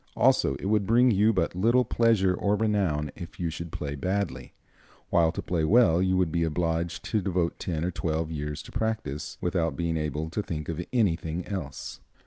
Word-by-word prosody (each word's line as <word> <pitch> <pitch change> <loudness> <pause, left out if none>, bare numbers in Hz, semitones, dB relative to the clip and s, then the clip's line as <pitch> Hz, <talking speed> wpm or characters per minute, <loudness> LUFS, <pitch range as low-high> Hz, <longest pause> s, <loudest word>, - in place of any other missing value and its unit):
Also, 70 - +3
it 70 - -7
would 105 -1 +1
bring 120 +2 +5
you 105 +2 +4
but 95 -4 0
little 115 +7 +3
pleasure 110 -6 +3
or 100 +2 +1
renown 95 -10 0
if 85 0 -9
you 85 -2 -1
should 85 0 -6
play 70 -1 -4
badly; 95 +6 -2 0.6
while 85 -1 +4
to - - -5
play 85 -3 -1
well 90 -2 +5
you 95 0 +2
would 90 -4 +1
be 85 - 0
obliged 80 +1 -1
to 110 - 0
devote 90 -3 -1
ten 80 -3 -2
or 90 - -1
twelve 80 -1 -2
years 75 -1 -4
to - - -12
practice, 110 -10 -3
without 85 -4 0
being 85 -1 -1
able 75 0 -2
to 105 - -1
think 75 -6 -5
of 85 +1 -3
anything 90 -7 0
else. 80 -10 -5
85 Hz, 190 wpm, -27 LUFS, 80-100 Hz, 0.6 s, bring